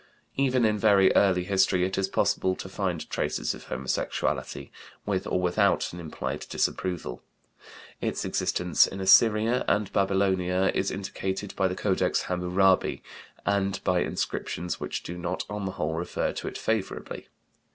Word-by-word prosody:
Even 130 -3 +2
in 105 -1 +1
very 100 -3 +5
early 90 -3 +4
history 95 -1 +2
it 95 - -2
is 95 0 0
possible 95 -1 +1
to - - -7
find 95 -4 -3
traces - - -1
of - - -11
homosexuality, 65 0 -2 0.3
with 95 -3 -1
or 90 - 0
without 90 -1 +1
an 90 - -7
implied 80 -3 -5
disapproval. 90 -9 -2 0.8
Its - - -2
existence 90 -4 +2
in 95 - -7
Assyria 110 +5 +5
and 105 -1 +1
Babylonia 95 -1 +2
is 95 - 0
indicated 95 0 -4
by 95 - +2
the 90 - -3
Codex 95 -2 +1
Hamurabi 90 +1 +1 0.4
and 100 -1 +1
by 90 -1 +2
inscriptions 90 0 -3
which - - -4
do 90 +1 -6
not 85 +1 -3
on 105 -1 -3
the 95 - -3
whole 75 +1 -2
refer 85 +2 -2
to - - -5
it - - -5
favorably. 110 -3 -3
95 Hz, 150 wpm, -27 LUFS, 90-100 Hz, 0.8 s, very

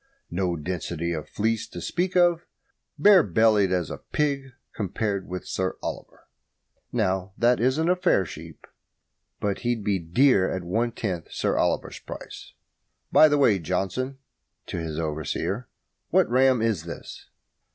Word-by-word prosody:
No 90 -1 0
density 85 +1 -3
of 75 -2 -5
fleece 110 +1 -1
to - - -8
speak 180 +1 -2
of. 175 -1 +3 0.5
Bare 200 -3 +7
bellied 105 - +3
as 90 -4 0
a - - -6
pig, 140 -3 -1 0.2
compared 100 -1 -2
with 90 0 -5
Sir 95 0 -2
Oliver. - - -7 0.6
Not 95 -4 -1
that 120 +1 +3
this 130 +3 +2
isn't 160 +2 0
a 180 - +4
fair 140 - +2
sheep, 80 0 -10 0.7
but 100 -1 -1
he'd 120 -3 -1
be 100 -2 +1
dear 95 +4 +3
at 95 - -3
one 115 +7 0
tenth 95 -8 -4
Sir - - 0
Oliver's - - 0
price. - - -10 0.6
By 155 - +8
the 145 -1 +2
way, 115 -9 +4
Johnson" 95 - -2 0.5
(to - - -5
his 80 -2 -4
overseer), 80 - -3 0.4
"what - - +4
ram 130 -2 +4
is 105 -8 0
this?" 85 - -9
100 Hz, 150 wpm, -25 LUFS, 90-130 Hz, 0.7 s, By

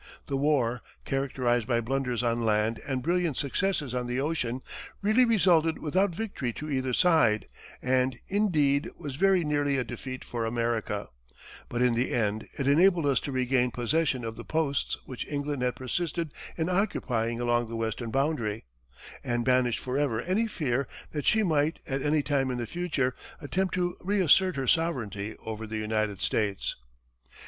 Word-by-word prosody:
The 140 - -2
war, 135 -4 +1 0.2
characterized 125 -4 0
by 120 -2 +2
blunders 125 0 -1
on 120 0 +1
land 110 0 +1
and 130 -2 -1
brilliant 170 -3 +1
successes 145 -2 0
on 125 -1 -2
the 125 +1 -1
ocean, 135 -4 -1 0.4
really 215 +5 +5
resulted 175 -8 +3
without 185 +6 +1
victory 175 - -3
to 150 +4 -6
either 130 -1 0
side, 135 - +4 0.4
and, 130 0 +2
indeed, 155 -9 +2
was 145 -6 -6
very 190 +2 +3
nearly 145 -2 +1
a 130 - +1
defeat 130 +2 -7
for 120 -1 -3
America; 115 -3 -1 0.6
but 120 +1 0
in 125 -1 +4
the 120 +2 0
end, 110 -2 0
it 140 - -1
enabled 170 +3 +4
us 140 -3 +3
to 140 - -5
regain 130 -1 +2
possession 130 +1 0
of 115 0 -5
the - - -7
posts 155 -4 0
which 130 - -6
England 145 -2 -2
had 125 -1 0
persisted 160 +4 -2 0.2
in 160 -1 0
occupying 125 - 0
along 120 -1 +1
the 115 - -5
western 115 +1 -2
boundary, 130 -5 -1 0.6
and 120 -1 -1
banished 125 -2 +3
forever 130 -3 0
any 195 - +1
fear 135 - -1 0.2
that 150 -2 -3
she 220 0 +4
might, 155 -3 +2
at 135 0 -2
any 150 +1 +2
time 140 -3 +1
in 125 - -2
the 120 - -2
future, 155 -5 -1 0.3
attempt 185 +4 -1
to 175 -1 0
reassert 190 -2 +4
her 135 -1 -2
sovereignty 110 - 0
over 110 0 -5
the 110 +1 -4
United 110 -2 -1
States. 100 -3 0
135 Hz, 165 wpm, -28 LUFS, 120-160 Hz, 0.6 s, really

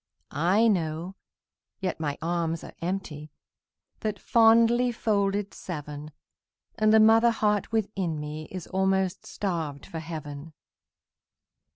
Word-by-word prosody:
I 185 +9 +3
know, 170 -2 -1 0.7
yet 185 -3 -3
my 145 -3 -2
arms 165 -1 -1
are - - -10
empty, 165 -4 -4 0.7
That 215 -2 -2
fondly 230 +3 +4
folded 205 -3 0
seven, 150 -3 -7 0.6
And 215 -1 +2
the 220 - +7
mother 225 +2 +6
heart 210 -3 0
within 195 -7 -1
me 150 +1 -6
Is 185 -3 -6
almost 190 -1 0
starved 160 -8 -3
for 165 - -6
heaven. 155 -1 -7
185 Hz, 110 wpm, -27 LUFS, 160-215 Hz, 0.7 s, the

